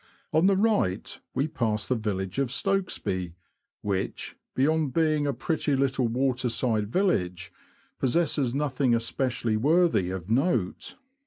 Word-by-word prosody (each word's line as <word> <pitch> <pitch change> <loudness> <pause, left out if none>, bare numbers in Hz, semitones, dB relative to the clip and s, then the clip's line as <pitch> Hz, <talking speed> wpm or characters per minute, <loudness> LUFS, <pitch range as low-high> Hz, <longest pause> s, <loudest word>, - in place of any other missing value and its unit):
On 160 +4 +4
the 195 - +4
right 200 - 0 0.2
we 140 - +1
pass 110 -8 -1
the - - +2
village 100 -2 -2
of 135 -3 +1
Stokesby, 115 - -1 0.5
which, 100 -2 -3 0.2
beyond 150 0 +2
being 155 -3 +2
a - - +2
pretty 145 +2 -1
little 135 -2 +1
waterside 120 -3 0
village, 90 - 0 0.5
possesses 135 -2 +1
nothing 135 -3 +1
especially 115 -1 -1
worthy 150 - +3
of 95 -2 -5
note. 120 - 0
130 Hz, 125 wpm, -27 LUFS, 110-155 Hz, 0.5 s, On